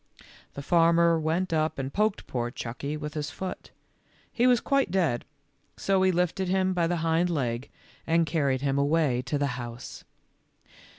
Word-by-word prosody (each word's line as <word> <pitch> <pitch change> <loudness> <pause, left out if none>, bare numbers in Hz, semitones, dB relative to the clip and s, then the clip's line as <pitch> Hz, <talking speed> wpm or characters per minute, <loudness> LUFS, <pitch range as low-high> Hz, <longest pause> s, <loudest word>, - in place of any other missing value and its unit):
The 140 - -6
farmer 170 0 +4
went 165 +3 -1
up 155 0 0
and 135 0 -4
poked 210 0 0
poor 120 -1 -2
Chucky 135 +5 -5
with 150 0 -6
his 150 -1 -3
foot. 190 -1 -6 0.6
He 245 +1 +3
was 245 -2 +5
quite 275 -4 +1
dead, 170 -10 0 0.5
so 195 -1 +1
he 190 0 +4
lifted 180 +2 0
him 190 0 +1
by 170 -2 +1
the 175 +1 0
hind 165 +2 +2
leg 125 -6 -2 0.4
and 165 +1 +3
carried 140 -5 0
him 140 0 0
away 140 -3 +2
to 135 +3 -2
the 145 - 0 0.2
house. 120 +1 -8
160 Hz, 165 wpm, -27 LUFS, 140-180 Hz, 0.6 s, was